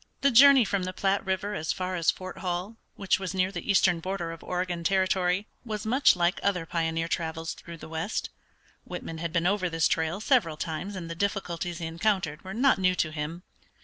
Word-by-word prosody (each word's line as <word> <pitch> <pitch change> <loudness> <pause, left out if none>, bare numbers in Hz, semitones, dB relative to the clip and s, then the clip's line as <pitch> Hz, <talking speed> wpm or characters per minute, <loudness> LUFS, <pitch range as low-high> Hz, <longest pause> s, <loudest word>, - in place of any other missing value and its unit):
The 280 - +4
journey 270 0 +8
from 200 -1 0
the 185 0 -3
Platte 195 +1 +1
River 190 +2 -2
as 160 -5 -2
far 185 0 -3
as 165 -2 +2
Fort 185 0 -3
Hall, 180 +4 -3 0.2
which 195 -1 +1
was 190 -1 -4
near 185 0 +1
the - - -6
eastern 185 -3 +4
border 175 -1 -3
of 165 - -10
Oregon 180 -1 -2
Territory, 185 +1 +1 0.2
was 215 -2 -5
much 260 +3 +4
like 175 +1 +1
other 180 -4 0
pioneer 165 0 -1
travels 165 -1 -3
through 170 -1 -10
the - - -10
west. 160 +6 -3 0.5
Whitman 165 -1 -7
had 170 0 -3
been 170 0 0
over 185 -1 +1
this 165 -1 +2
trail 160 +3 0
several 215 - +2
times 170 +6 -4
and 175 -3 -6
the 165 - -4
difficulties 175 -2 -2
he 170 - -4
encountered 170 -2 -1
were 190 +1 -7
not 260 -2 +4
new 185 -1 +3
to 155 -3 0
him. 160 +3 -5
180 Hz, 205 wpm, -27 LUFS, 165-195 Hz, 0.5 s, journey